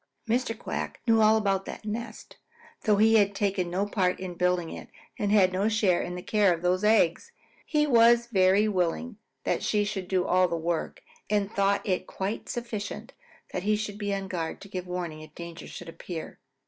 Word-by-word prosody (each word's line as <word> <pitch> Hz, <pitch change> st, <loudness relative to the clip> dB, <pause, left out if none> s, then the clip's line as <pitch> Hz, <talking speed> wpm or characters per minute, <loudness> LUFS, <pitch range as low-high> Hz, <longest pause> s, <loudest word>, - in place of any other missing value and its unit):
Mr. 230 Hz, 0 st, 0 dB
Quack -, -, -5 dB
knew 225 Hz, -2 st, +4 dB
all 215 Hz, +1 st, +6 dB
about 195 Hz, -3 st, 0 dB
that -, -, -8 dB
nest, 230 Hz, +3 st, -6 dB, 0.5 s
though 210 Hz, -, +4 dB
he 220 Hz, +2 st, +5 dB
had 200 Hz, -1 st, +2 dB
taken 195 Hz, -3 st, 0 dB
no 185 Hz, +3 st, 0 dB
part 190 Hz, -3 st, 0 dB
in 185 Hz, -1 st, -5 dB
building 180 Hz, -1 st, 0 dB
it -, -, -9 dB, 0.3 s
and 205 Hz, -1 st, 0 dB
had 190 Hz, -3 st, +5 dB
no 195 Hz, +4 st, +1 dB
share 210 Hz, -5 st, +2 dB
in 180 Hz, -, -4 dB
the 180 Hz, -, -7 dB
care 210 Hz, -3 st, +3 dB
of 170 Hz, 0 st, -2 dB
those 180 Hz, +2 st, +1 dB
eggs. 215 Hz, -, +3 dB, 0.4 s
He 300 Hz, -2 st, +2 dB
was 235 Hz, -3 st, +5 dB
very 200 Hz, -2 st, +3 dB
willing 205 Hz, +4 st, -1 dB, 0.3 s
that -, -, 0 dB
she 210 Hz, -1 st, +1 dB
should 195 Hz, -3 st, -4 dB
do 185 Hz, -1 st, +1 dB
all 185 Hz, 0 st, +3 dB
the 170 Hz, -1 st, -2 dB
work 165 Hz, 0 st, -3 dB, 0.3 s
and 205 Hz, -1 st, +1 dB
thought 200 Hz, +1 st, +1 dB
it 185 Hz, -1 st, -1 dB
quite 195 Hz, +3 st, -4 dB
sufficient 235 Hz, -4 st, -5 dB, 0.4 s
that 180 Hz, -, -2 dB
he 210 Hz, +3 st, +2 dB
should 210 Hz, -1 st, -4 dB
be 205 Hz, -1 st, -2 dB
on 195 Hz, -1 st, -2 dB
guard 170 Hz, -3 st, -4 dB
to -, -, -10 dB
give 185 Hz, -1 st, -5 dB
warning 175 Hz, -3 st, -4 dB
if 155 Hz, 0 st, -13 dB
danger 170 Hz, -1 st, -8 dB
should 175 Hz, -, -9 dB
appear. 165 Hz, 0 st, -7 dB
195 Hz, 200 wpm, -27 LUFS, 180-215 Hz, 0.5 s, all